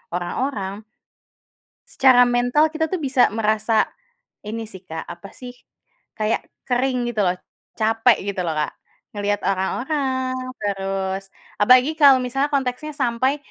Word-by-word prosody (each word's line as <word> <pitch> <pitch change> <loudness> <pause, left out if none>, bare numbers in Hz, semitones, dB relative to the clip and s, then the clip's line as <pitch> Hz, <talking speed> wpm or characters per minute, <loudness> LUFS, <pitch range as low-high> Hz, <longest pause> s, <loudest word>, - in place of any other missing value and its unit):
orang-orang 200 +2 -3 1.0
secara 255 -2 +5
mental 245 +5 +3
kita 320 0 -1
itu 375 - -1
bisa 270 -5 +3
merasa 215 0 +1 0.6
ini 225 +2 -5
sih 190 -4 -10
Kak, 160 0 -5
apa 175 +3 -10
sih, 250 -1 -9 0.6
kayak 215 +1 0 0.3
kering 250 -1 0
gitu 215 - 0
loh, 180 0 +1 0.4
capek 225 +1 +3
gitu 190 - -3
loh, 165 - -1
Kak. 150 -1 -1 0.4
Ngelihat 205 -1 -1
orang-orang 260 +6 -1 0.3
terus 195 -1 -3 0.3
apalagi 255 +7 +6
kalau 280 -4 +7
misalnya 270 +3 -1
konteksnya 270 +2 -1
sampai 260 +1 +1
240 Hz, 125 wpm, -22 LUFS, 200-260 Hz, 1.0 s, kalau